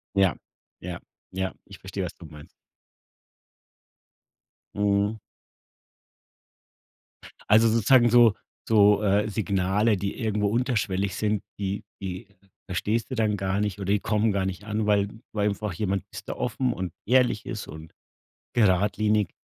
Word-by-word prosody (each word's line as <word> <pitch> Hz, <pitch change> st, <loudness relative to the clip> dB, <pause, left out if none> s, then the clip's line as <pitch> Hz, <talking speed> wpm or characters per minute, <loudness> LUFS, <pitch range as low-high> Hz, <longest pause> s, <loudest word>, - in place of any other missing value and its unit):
Ja, 95 Hz, -4 st, +4 dB, 0.5 s
ja, 90 Hz, -1 st, -5 dB, 0.4 s
ja. 95 Hz, 0 st, -2 dB
Ich 100 Hz, -, -13 dB
verstehe, 95 Hz, 0 st, -4 dB
was 90 Hz, -, -7 dB
du 85 Hz, -, -13 dB
meinst. 75 Hz, -1 st, -12 dB, 2.3 s
Mhm. 100 Hz, +1 st, +1 dB, 2.3 s
Also, 110 Hz, +2 st, +6 dB
sozusagen 120 Hz, +2 st, +5 dB
so 120 Hz, -3 st, +6 dB, 0.3 s
so, 105 Hz, -1 st, +5 dB
äh, 105 Hz, +1 st, +2 dB
Signale, 100 Hz, +1 st, +1 dB
die 100 Hz, +1 st, -4 dB
irgendwo 105 Hz, -3 st, 0 dB
unterschwellig 100 Hz, -5 st, 0 dB
sind, 105 Hz, -1 st, -1 dB, 0.2 s
die 100 Hz, +2 st, -3 dB, 0.2 s
die 95 Hz, +3 st, -5 dB, 0.4 s
verstehst 110 Hz, +7 st, -1 dB
du 130 Hz, -, -2 dB
dann 105 Hz, -2 st, +1 dB
gar 95 Hz, +1 st, -1 dB
nicht 105 Hz, -2 st, -1 dB
oder 100 Hz, -, -5 dB
die 105 Hz, -, +2 dB
kommen 105 Hz, +1 st, +1 dB
gar 95 Hz, -1 st, 0 dB
nicht 95 Hz, +1 st, -5 dB
an, 105 Hz, 0 st, -2 dB
weil 100 Hz, -1 st, +3 dB, 0.3 s
weil 105 Hz, 0 st, +2 dB
einfach 100 Hz, -1 st, -3 dB
jemand 95 Hz, 0 st, -1 dB
ist -, -, -9 dB
da -, -, -2 dB
offen 125 Hz, -2 st, -1 dB
und 90 Hz, -2 st, -4 dB
ehrlich 125 Hz, -2 st, +2 dB
ist 110 Hz, -4 st, -5 dB
und 80 Hz, 0 st, -11 dB, 0.6 s
geradlinig 105 Hz, -1 st, +2 dB
105 Hz, 135 wpm, -26 LUFS, 95-110 Hz, 2.3 s, Also